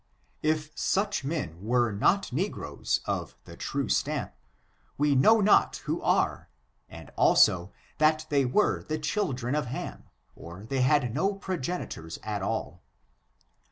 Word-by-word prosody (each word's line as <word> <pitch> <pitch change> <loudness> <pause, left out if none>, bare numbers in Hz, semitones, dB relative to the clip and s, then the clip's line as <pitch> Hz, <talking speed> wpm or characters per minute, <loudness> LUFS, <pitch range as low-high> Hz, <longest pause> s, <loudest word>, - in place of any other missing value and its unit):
If 155 0 0
such 200 -5 0
men 100 - -4
were 120 +1 +2
not 130 - +1
negroes 135 - -2
of - - -3
the - - -12
true - - -3
stamp, - - -1 0.6
we 145 0 +3
know 215 +12 +5
not 205 +1 +4
who - - -2
are, - - +1 0.4
and, - - -11
also, 90 +1 +4 0.3
that 155 0 +3
they 140 -2 +3
were 135 +12 +2
the 155 - -3
children 145 - -2
of 150 -4 -1
Ham, 125 - -6 0.3
or 90 +5 -10
they 135 +2 -1
had 130 -2 +2
no 195 +9 0
progenitors 175 - -4
at 105 -2 -3
all. 95 -5 -3
140 Hz, 135 wpm, -28 LUFS, 110-160 Hz, 0.6 s, know